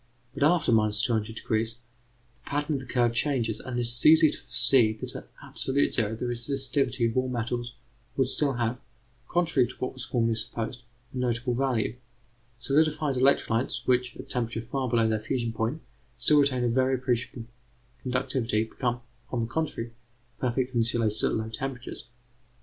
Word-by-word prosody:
But, - - -8
after 160 -1 +4
200°, 110 0 +2
the 110 +1 -1 0.6
pattern 145 +1 -1
of - - -5
the 130 - -10
curves 120 -2 +1
changes, 120 -7 0
and 130 -1 -5
it - - +1
is 120 0 +2
easy 155 -1 +7
to - - -8
foresee 120 -1 +3
that 110 - -8
at - - -9
absolute 135 +2 0
zero 110 -2 0
the 115 - -4
resistivities 130 0 0
of 115 - -5
all 130 0 +1
metals 120 0 -3 0.4
would 135 -2 +3
still 140 +1 +2
have, 120 0 -1 0.5
contrary 170 -8 +2
to - - -10
what 130 - -4
was 130 -1 -6
formerly 115 -3 +1
supposed, 115 +2 -4 0.3
a - - -5
notable 120 0 0
value. 125 -3 0 0.6
Solidified 150 +1 +1
electrolytes 130 -2 +2
which, 125 -1 +1
at - - -9
temperatures 115 -2 -2
far 135 -2 -1
below 115 -1 +3
their 110 -1 +1
fusion 115 +1 -2
point, 115 +8 -2 0.3
still 150 -1 +4
retain 135 -3 +2
a - - +2
very 130 +2 +2
appreciable 125 -2 -2 0.6
conductivity, 125 -3 0
become, 120 +1 -3 0.3
on 120 - -1
the - - 0
contrary, 125 -3 -3 0.5
perfect 125 +1 -1
insulators 115 -2 +1
at - - +2
low 110 0 -2
temperatures. 125 +3 -5
125 Hz, 160 wpm, -27 LUFS, 115-135 Hz, 0.6 s, easy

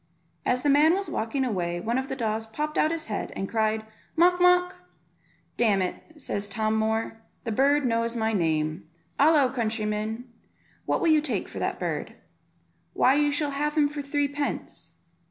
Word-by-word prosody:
As 250 0 +1
the 290 - +2
man 305 +4 +5
was 395 0 -3
walking 260 +5 -1
away 175 -7 -2
one 230 +7 0
of 265 - -4
the 265 - -2
daws 225 -3 -2
popped 300 +7 -4
out 310 - +3
his 330 -1 -3
head, 215 - -4
and 195 - -3
cried 220 0 0 0.3
"Mawk, 355 +2 +4
mawk." 360 0 +4 0.8
"Damn 215 -5 +3
it," 305 - -7
says 205 -6 -4
Tom 215 +2 0
Moor, 220 +1 -1 0.2
"that 230 - -3
bird 280 +5 +3
knows 230 0 0
my 220 -1 0
name; 160 -2 -1 0.3
halloo, 285 -3 +5
countryman, 220 0 -2 0.6
what - - +1
will 335 - +3
you 310 -1 +5
take 295 -3 -2
for - - -7
the - - -1
bird?" - - -3 0.8
"Why, 260 - +4
you 290 +1 +2
shall 290 0 0
have 295 +2 -1
him 295 -1 +5
for 290 0 -5
threepence." 285 0 -3
250 Hz, 175 wpm, -26 LUFS, 220-295 Hz, 0.8 s, man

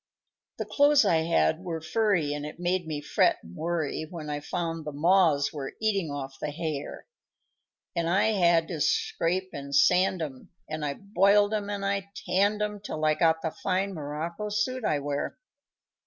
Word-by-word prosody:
_ - - -1
_The - - -21
clothes 285 -4 +5
I 170 -5 +4
had 165 -1 +2
were 170 -3 -3
furry, 175 -4 +1
And 145 0 -4
it 150 +3 -7
made 175 -1 0
me 150 -2 -3
fret 150 - +2
and 85 +1 -12
worry 160 -2 -2
When 155 -4 -6
I 145 - -2
found 165 +1 -3
the 150 - -5
moths 155 -2 +3
were 140 -3 -5
eating 200 -6 0
off 135 -2 -6
the - - -2
hair; 150 -2 -5 0.9
And 170 -1 0
I 195 +5 +3
had 170 -5 +3
to 160 -4 -4
scrape 185 +6 0
and 140 0 -5
sand 180 +3 +4
'em, 135 -4 -8 0.2
And 155 0 -4
I 140 -1 -2
boiled 200 +1 +3
'em 205 -1 -2
and 200 -1 -3
I 200 0 -1 0.2
tanned 205 +3 +2
'em, 210 -1 -3
Till 155 -6 -4
I 155 - +4
got 160 0 +2
the 160 - -1
fine 195 +3 -1
morocco 165 +6 -4
suit 235 +5 -1
I 150 - +1
wear. 145 0 -3
170 Hz, 185 wpm, -27 LUFS, 150-195 Hz, 0.9 s, clothes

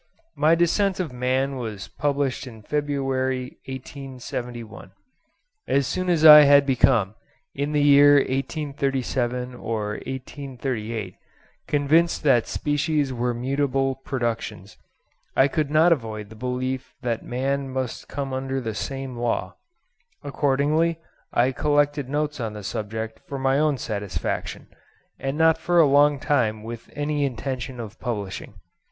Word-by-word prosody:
My 155 +3 +4
'Descent 185 +3 +2
of 165 -8 -3
Man' 130 +2 0
was 110 -6 -5
published 140 -2 -1
in 110 -3 -11
February, 135 -2 -2
1871. 125 -5 -7 0.7
As 140 0 +2
soon 185 +5 -2
as 165 -3 +3
I 150 -1 +12
had 140 -1 +6
become, 120 -6 +3 0.4
in 145 +2 -2
the 150 -1 +2
year 145 0 +7
1837 135 -3 -1
or 110 -3 -3 0.2
1838, 125 -6 -5 0.5
convinced 155 +5 +2
that 130 -6 +4
species 145 -1 0
were 120 0 -1
mutable 135 +1 0
productions, 115 -6 -4 0.6
I 135 - +5
could 150 0 -1
not 155 +3 +4
avoid 110 -7 -5
the - - -10
belief 125 +2 -3
that 115 -2 -1
man 135 +2 -2
must 130 -2 -4
come 135 -1 -4
under 135 0 -2
the 115 -4 -4
same 135 +3 -5
law. 115 -6 -2 0.7
Accordingly 145 +4 +1 0.3
I 125 +2 +3
collected 145 0 +1
notes 150 0 -1
on 110 -3 -3
the 105 -1 -8
subject 110 +2 -4
for 140 - -4
my 135 +1 +2
own 150 -2 +2
satisfaction, 105 -4 -4 0.5
and 135 +2 -3
not 160 0 +4
for 175 +1 +2
a 165 - +7
long 145 0 +4
time 110 -8 0
with 115 0 -8
any 145 0 -1
intention 130 -1 -3
of 110 -1 -8
publishing. 105 -6 -5
135 Hz, 130 wpm, -24 LUFS, 120-145 Hz, 0.7 s, I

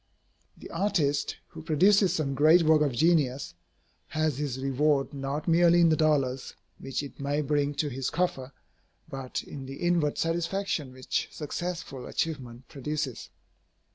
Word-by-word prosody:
The - - -11
artist, 165 -6 0
who - - -10
produces 185 +5 +4
some 145 -5 -1
great 155 +5 +5
work 155 -1 +4
of 145 -2 +2
genius, 140 - +1 0.5
has 155 -3 -1
his 140 -4 -2
reward 135 +2 +1
not 140 +2 -4
merely 170 +1 +5
in 170 -1 +6
the 160 - +4
dollars 140 -5 0 0.2
which 135 +1 -3
it 140 - -10
may 140 +2 0
bring 145 0 0
to 150 - 0
his 135 -1 -3
coffer, 140 -7 -1 0.6
but 135 -2 -5
in 135 -2 -8
the 135 - -7
inward 170 -2 +1
satisfaction 165 -3 -1
which 130 0 -2
successful 160 -4 -5
achievement 130 -6 -4
produces. 145 -3 -4
150 Hz, 140 wpm, -28 LUFS, 135-165 Hz, 0.6 s, in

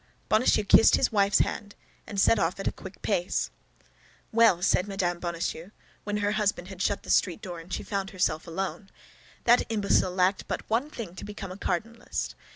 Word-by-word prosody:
Bonacieux 215 0 +3
kissed 205 - +6
his 255 - +1
wife's 200 -2 +3
hand, 205 0 -4 0.3
and 200 - -3
set 215 +3 +4
off 170 +3 0
at 195 - -3
a - - +2
quick 190 0 -12
pace. 190 -3 0 0.8
"Well," 220 -6 +4
said 190 0 +2
Mme. 180 -3 -1
Bonacieux, 170 0 -4 0.4
when 205 0 -1
her 205 0 0
husband 205 -4 -1
had 190 -2 -8
shut 200 +1 0
the - - -3
street 180 -4 +2
door 180 -5 -7
and 165 +3 -13
she - - -3
found 195 -1 -3
herself 165 -5 -1
alone; 195 +3 -4 0.5
"that 240 +1 +5
imbecile 205 -3 +2
lacked 185 +1 +1
but - - -4
one 240 +7 0
thing: 225 - -7
to - - -9
become 205 -2 -7
a - - -7
cardinalist. 225 +4 -3
195 Hz, 185 wpm, -27 LUFS, 180-210 Hz, 0.8 s, kissed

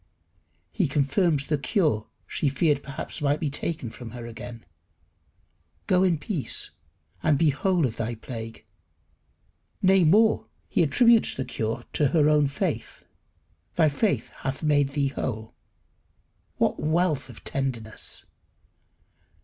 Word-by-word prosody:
He 185 -7 +1
confirms 145 +2 +2
the 150 0 0
cure 150 - +1 0.2
she 145 - 0
feared 145 +1 +2
perhaps 140 +1 -6
might 145 0 +2
be 150 -4 -1
taken 145 -5 -3
from 120 -1 -9
her 120 - -7
again. 115 0 -9 1.2
"Go 180 -1 +3
in 180 -3 +3
peace, 155 - -2 0.5
and 150 +4 +3
be 160 -1 +4
whole 175 +2 +1
of 115 -3 -3
thy 115 +1 -2
plague." 115 -1 -8 1.1
Nay, 190 -1 +5
more, 215 +7 +4 0.2
he - - +1
attributes 230 - +4
her 130 - -2
cure 115 -1 -3
to 150 - +3
her 150 +1 +3
own 150 -1 +4
faith. 135 - -3 0.7
"Thy 160 -3 +4
faith 190 +8 0
hath 135 +2 -4
made 145 -2 +3
thee 140 -2 +1
whole." 110 -5 -4 1.0
What - - +1
wealth 155 -2 +1
of 120 - -12
tenderness! 120 -6 -3
145 Hz, 130 wpm, -26 LUFS, 130-165 Hz, 1.2 s, Nay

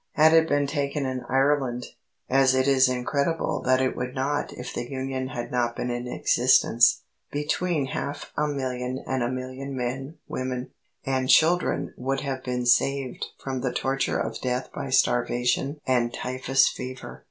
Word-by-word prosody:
Had 155 +1 +5
it 160 0 +5
been 145 0 +2
taken 140 0 -2
in 130 -1 -3
Ireland 135 -2 +1 0.4
as 135 0 +4
it 130 +1 +2
is 130 -2 +5
incredible 140 +5 -1
that 130 0 +3
it 130 - 0
would 125 +1 -4
not 140 +2 -1
if 125 - -7
the 120 - -4
Union 130 -1 -3
had 120 -2 -5
not 120 -1 0
been 125 - -2
in 120 0 -4
existence 120 -1 +3 0.3
between 150 +1 0
half 140 +2 -5
a 150 - +1
million 130 -2 -3
and 130 -1 -1
a 120 - 0
million 130 +2 -5
men, 135 +5 -4
women, 130 -1 -4 0.3
and 130 -1 0
children 175 +3 +3
would 135 +2 -1
have 135 -2 -4
been 125 -1 -2
saved 130 +2 +1
from 130 -2 -4
the 125 - -1
torture 135 +2 0
of - - -3
death 125 0 -2
by 140 - -5
starvation 125 +2 +1
and 120 -2 +2
typhus 130 +2 +1
fever. 130 0 -6
130 Hz, 165 wpm, -26 LUFS, 125-140 Hz, 0.4 s, Had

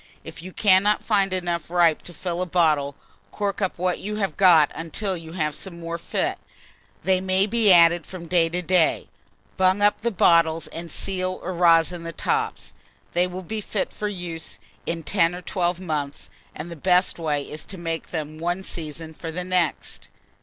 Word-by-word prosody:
If - - -9
you 185 +2 -8
cannot 200 +1 +3
find 200 -3 +2
enough 175 -3 -2
ripe 170 -3 +3
to 175 - -9
fill 175 +1 -3
a 185 - -1
bottle, 155 -5 +2 0.3
cork 205 0 -3
up 190 - -1
what 180 0 0
you 210 +2 -4
have 195 -7 -2
got 170 -6 +6
until 185 +4 -3
you 165 -1 -9
have 150 -4 -1
some 170 +3 -7
more 170 0 -5
fit: - - -2 0.6
they 185 -1 +2
may 190 +1 +2
be 215 -1 +3
added 170 -1 +6
from 180 -2 -8
day 165 -1 +2
to 180 +2 -3
day. 175 -1 +2 0.5
Bung 190 +2 +3
up 205 - +3
the 235 - +1
bottles, 165 -5 +3
and 170 0 -7
seal 185 0 -3
or 185 - -3
rosin 170 0 +4
the 165 0 -5
tops. - - -2 0.4
They 175 +1 +2
will 180 +1 -7
be 215 +4 -4
fit 205 -1 -3
for 210 - -3
use 175 -5 -5 0.3
in 165 -1 -2
10 170 -1 +2
or 180 - -8
12 175 -1 -1
months; 150 -6 -4 0.2
and 165 +3 -7
the - - -6
best 180 +3 +2
way 150 -3 -1
is 150 +2 -8
to 195 - -9
make 165 -1 -4
them 155 -2 -5
one 175 +3 -2
season 160 -2 -6
for 165 +1 -7
the 180 +3 -4
next. 180 -3 -1
175 Hz, 190 wpm, -24 LUFS, 165-185 Hz, 0.6 s, got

